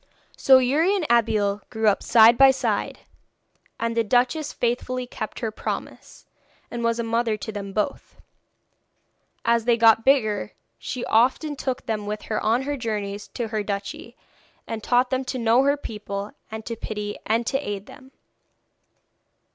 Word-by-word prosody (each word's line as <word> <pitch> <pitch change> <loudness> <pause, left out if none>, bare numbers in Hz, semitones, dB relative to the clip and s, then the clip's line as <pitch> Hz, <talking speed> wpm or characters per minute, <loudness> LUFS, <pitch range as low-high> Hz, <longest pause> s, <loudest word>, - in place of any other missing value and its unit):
So 265 -1 +6
Youri 295 +10 +2
and 370 -5 -1
Abeille 210 -3 +2
grew 220 0 -1
up 205 - +3
side 230 +1 +6
by 270 +2 +7
side, 265 - -1 0.8
and 230 0 -1
the 230 - +2
duchess 250 +7 +1
faithfully 250 +1 -2
kept 215 -3 -7
her 225 -2 -2
promise, - - -6 0.5
and 240 -1 -4
was 230 0 +1
a 235 - -1
mother 230 -1 0
to 210 +2 -6
them 200 -2 -6
both. 210 +7 -3 1.3
As 230 -1 +2
they 240 -1 +3
got 225 -1 +5
bigger 220 - +2 0.3
she 245 - -5
often 265 +6 +2
took 260 -2 -4
them 215 -2 -3
with 210 0 -4
her - - 0
on 230 +4 +2
her 290 +1 -3
journeys 210 -4 -4
through 235 -2 -5
her 215 -1 -1
duchy, 205 +3 -5 0.5
and 225 -1 -5
taught 250 +1 +2
them 260 0 0
to 255 - -3
know 235 +1 +3
her 280 +1 +2
people, 205 -5 -6 0.2
and 220 0 -7
to 230 - -4
pity 210 -2 -5
and 230 +2 +1
to 270 - 0
aid 205 -6 -5
them. 260 +3 -15
230 Hz, 165 wpm, -24 LUFS, 215-255 Hz, 1.3 s, by